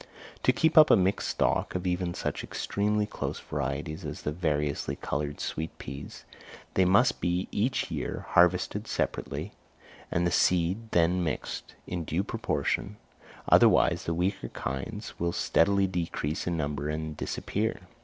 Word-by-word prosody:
To - - +4
keep 160 0 +4
up 155 - +8
a - - +8
mixed 95 +1 +1
stock - - 0
of 90 0 -2
even 90 -1 -1
such - - -3
extremely 105 +1 0
close 105 - -4
varieties 75 +2 -4
as - - -6
the 75 - -1
variously 75 -3 -1
coloured 75 +1 -3
sweet 80 +1 -4
peas, 70 +1 -8 0.5
they 95 - +4
must 100 +7 +4
be 90 +2 0
each 120 +5 0
year - - -3
harvested - - +3
separately, - - -2 0.6
and 85 +1 +1
the 85 - +1
seed 90 +6 +2
then 90 0 +3
mixed 80 - -4
in 90 -2 -3
due 80 +4 -1
proportion, 105 0 -2 0.5
otherwise - - +5
the 85 - -1
weaker 95 +3 -1
kinds 105 +12 -5
will 85 0 0
steadily 100 +3 +3
decrease 85 -4 -2
in 85 -1 0
number 75 -1 -2
and 80 0 -3
disappear. 110 +7 -2
85 Hz, 145 wpm, -28 LUFS, 75-100 Hz, 0.6 s, up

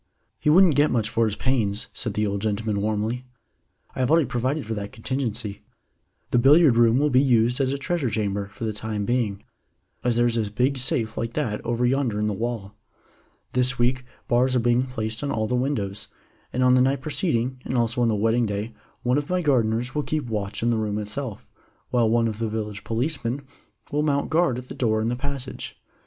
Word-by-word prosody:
"He - - +1
wouldn't 175 +1 +6
get 145 +2 +4
much 110 -3 +1
for 115 - +2
his 105 -2 -1
pains," 110 -5 0
said 110 -4 -3
the 105 - +1
old 100 -1 -2
gentleman 105 -1 -1
warmly. 110 +4 -2 0.7
"I - - -6
have 130 -1 +1
already 160 -1 +4
provided 130 +4 -1
for 110 - -3
that 105 -1 -5
contingency. 115 -4 -3 0.7
The 120 - +4
billiard 140 +1 +6
room 115 0 +5
will 145 +1 +2
be 130 +1 +5
used 125 -1 +3
as 130 -1 +1
a 140 - -1
treasure 140 -1 -1
chamber 100 -2 -1
for 110 - -9
the 110 -1 -1
time 105 -1 -3
being, 110 -4 -1 0.6
as 120 -1 +1
there 120 +1 +3
is 120 -1 +1
a 110 -2 0
big 130 +6 0
safe 120 -3 0
like 115 +1 -3
that 115 -9 -2
over 120 +1 0
yonder 125 -4 +1
in 105 - 0
the 105 - 0
wall. 110 -2 -4 0.8
This 125 +1 +1
week 125 +2 +1 0.2
bars 125 +2 +2
are - - +4
being 120 +2 +2
placed 110 -1 -4
on 145 - -1
all 110 -4 0
the 110 - -2
windows, 125 -6 -1 0.4
and 130 - 0
on 125 0 +5
the 130 - +5
night 135 +1 +2
preceding, 130 -4 -1
and 130 - -2
also 120 +1 +1
on 120 - +3
the 110 - +2
wedding 115 +3 +2
day, 105 +3 -3 0.3
one 125 +3 +2
of 145 - -6
my 180 0 0
gardeners 125 -3 +1
will 150 - 0
keep 155 -1 -2
watch 105 -2 -3
in 120 - +3
the 115 - +1
room 105 -1 -1
itself, 105 +2 -4 0.5
while 120 -3 +3
one 115 0 +3
of 110 -1 -4
the 115 -1 -1
village 105 -1 -4
policemen 125 +2 -2 0.5
will 150 - +1
mount 145 -1 0
guard 160 -6 +2
at 125 0 -7
the - - -7
door 110 -3 +1
in 110 +1 0
the 120 - -1
passage. 135 0 -5
120 Hz, 215 wpm, -24 LUFS, 110-130 Hz, 0.8 s, wouldn't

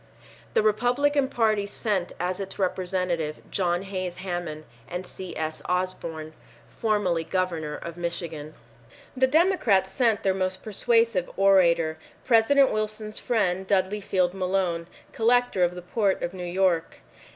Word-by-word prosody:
The - - +4
Republican 250 +6 +2
Party 215 -5 +1
sent 200 -3 -2
as 180 +1 -2
its 195 -1 -5
representatives 180 -4 -1
John 175 -1 0
Hays 185 -2 -4
Hammond 175 -4 -4 0.2
and 180 +1 -5
C. 180 -1 -8
S. 155 0 -3
Osborn, 170 -4 -3 0.3
formerly 205 -7 0
Governor 165 -4 -2
of 170 0 -8
Michigan. 165 -3 -5 0.6
The 260 0 +3
Democrats 260 - +3
sent 225 -1 +1
their 190 - +3
most 185 0 -2
persuasive 225 -2 +1
orator, 170 -5 +4 0.3
President 260 +4 +5
Wilson's 215 0 -3
friend, 190 -5 0
Dudley 195 +1 +1
Field 185 -2 +1
Malone, 185 -3 -1 0.3
Collector 235 -4 +2
of 175 0 +1
the 180 - -8
Port 195 +1 0
of 175 - -3
New 180 -1 -6
York. 175 -2 0
185 Hz, 130 wpm, -26 LUFS, 175-215 Hz, 0.6 s, President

